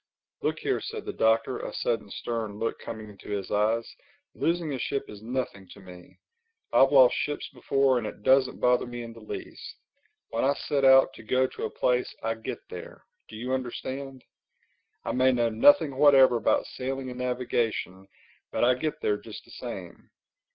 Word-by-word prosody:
"Look -, -, 0 dB
here," -, -, -1 dB
said -, -, -6 dB
the -, -, -4 dB
Doctor, 115 Hz, +3 st, +2 dB
a -, -, -5 dB
sudden 115 Hz, -4 st, -2 dB
stern 110 Hz, -2 st, -4 dB
look 115 Hz, +1 st, -2 dB
coming 110 Hz, -1 st, -7 dB
into 100 Hz, -, -14 dB
his 100 Hz, -2 st, -3 dB
eyes, 110 Hz, +3 st, +1 dB, 0.5 s
"losing 165 Hz, -3 st, -1 dB
a 130 Hz, -, -3 dB
ship 140 Hz, +3 st, -2 dB
is 105 Hz, -1 st, -11 dB
nothing 115 Hz, -5 st, -4 dB
to -, -, -15 dB
me. 90 Hz, -2 st, -14 dB, 0.6 s
I've 135 Hz, +1 st, +6 dB
lost 130 Hz, -3 st, +7 dB
ships 145 Hz, -, -2 dB
before 135 Hz, -2 st, +1 dB
and 110 Hz, -, -4 dB
it 105 Hz, -, -9 dB
doesn't 130 Hz, +1 st, +3 dB
bother 125 Hz, 0 st, +2 dB
me 120 Hz, 0 st, -6 dB
in 115 Hz, 0 st, -9 dB
the 115 Hz, -, -13 dB
least. 110 Hz, -, -8 dB, 0.5 s
When 115 Hz, -, -1 dB
I 140 Hz, +2 st, +3 dB
set 140 Hz, -1 st, -1 dB
out 135 Hz, 0 st, +6 dB
to -, -, -12 dB
go 130 Hz, +4 st, +2 dB
to -, -, -5 dB
a -, -, -3 dB
place, 125 Hz, 0 st, 0 dB
I 115 Hz, 0 st, 0 dB
get 110 Hz, 0 st, -7 dB
there. -, -, -10 dB, 0.2 s
Do -, -, -11 dB
you 125 Hz, +4 st, -3 dB
understand? 130 Hz, +1 st, -5 dB, 0.8 s
I -, -, -1 dB
may 130 Hz, +1 st, +3 dB
know 120 Hz, -2 st, +1 dB
nothing 140 Hz, +5 st, +5 dB
whatever 135 Hz, -3 st, +6 dB
about 115 Hz, -, +2 dB
sailing 130 Hz, 0 st, -5 dB
and 125 Hz, -, -8 dB
navigation, 120 Hz, -6 st, -2 dB, 0.4 s
but -, -, -1 dB
I 125 Hz, +1 st, +5 dB
get 150 Hz, +5 st, -3 dB
there 105 Hz, -, +1 dB
just 105 Hz, +1 st, -11 dB
the -, -, -17 dB
same. -, -, -8 dB
125 Hz, 185 wpm, -27 LUFS, 110-130 Hz, 0.8 s, lost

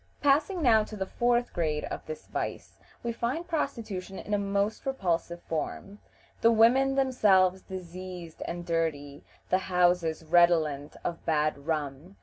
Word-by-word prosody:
Passing 310 Hz, +5 st, +3 dB
now 220 Hz, -4 st, +5 dB
to 215 Hz, -, -9 dB
the 190 Hz, -, -2 dB
fourth 240 Hz, +3 st, +1 dB
grade 155 Hz, -3 st, -1 dB
of -, -, -6 dB
this 470 Hz, 0 st, -7 dB
vice, -, -, -5 dB, 0.3 s
we 235 Hz, -, -1 dB
find 250 Hz, +9 st, -2 dB
prostitution 215 Hz, -, -3 dB
in 210 Hz, -, -5 dB
a 205 Hz, -, +2 dB
most 200 Hz, +2 st, -1 dB
repulsive 175 Hz, -9 st, -2 dB
form; 195 Hz, +5 st, -4 dB, 0.4 s
the 230 Hz, -, +6 dB
women 255 Hz, +5 st, +4 dB
themselves 195 Hz, -9 st, +3 dB
diseased 180 Hz, -2 st, -8 dB
and 175 Hz, 0 st, -5 dB
dirty, 155 Hz, -4 st, -2 dB, 0.3 s
the 185 Hz, -, +4 dB
houses 175 Hz, -3 st, +1 dB
redolent 160 Hz, -4 st, +3 dB
of 170 Hz, -1 st, -4 dB
bad 150 Hz, -2 st, 0 dB
rum. 155 Hz, +3 st, -3 dB
185 Hz, 140 wpm, -28 LUFS, 165-230 Hz, 0.4 s, the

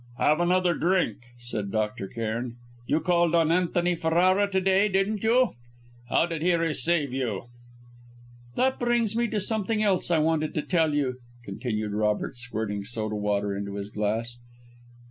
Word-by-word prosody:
"Have 155 Hz, +2 st, +3 dB
another 180 Hz, 0 st, +2 dB
drink," 165 Hz, -, 0 dB
said 110 Hz, -4 st, -4 dB
Dr. 105 Hz, -1 st, -2 dB
Cairn. 115 Hz, +2 st, -4 dB, 0.3 s
"You 155 Hz, -, +1 dB
called 175 Hz, -2 st, +2 dB
on 165 Hz, -1 st, +3 dB
Antony 175 Hz, 0 st, +1 dB
Ferrara 180 Hz, +5 st, +2 dB
to 190 Hz, -1 st, +1 dB
day, 195 Hz, +2 st, +3 dB
didn't 195 Hz, +2 st, 0 dB
you? 240 Hz, +2 st, +3 dB, 0.6 s
How 160 Hz, -, +3 dB
did 165 Hz, -3 st, -4 dB
he 175 Hz, +1 st, +3 dB
receive 165 Hz, -3 st, +1 dB
you?" 120 Hz, -4 st, -3 dB, 1.1 s
"That 260 Hz, +1 st, +1 dB
brings 240 Hz, -3 st, +1 dB
me 235 Hz, 0 st, +1 dB
to 215 Hz, -1 st, -1 dB
something 215 Hz, +1 st, 0 dB
else 195 Hz, -4 st, +2 dB
I 170 Hz, -, +3 dB
wanted 155 Hz, 0 st, 0 dB
to 150 Hz, -, -1 dB
tell 160 Hz, -4 st, +1 dB
you," 130 Hz, -3 st, 0 dB, 0.3 s
continued 105 Hz, +1 st, -3 dB
Robert, 105 Hz, +2 st, 0 dB
squirting 110 Hz, -4 st, -4 dB
soda 110 Hz, 0 st, -4 dB
water 105 Hz, -1 st, -1 dB
into 100 Hz, 0 st, -5 dB
his 100 Hz, 0 st, -6 dB
glass. 110 Hz, +4 st, -2 dB
155 Hz, 155 wpm, -26 LUFS, 110-185 Hz, 1.1 s, Have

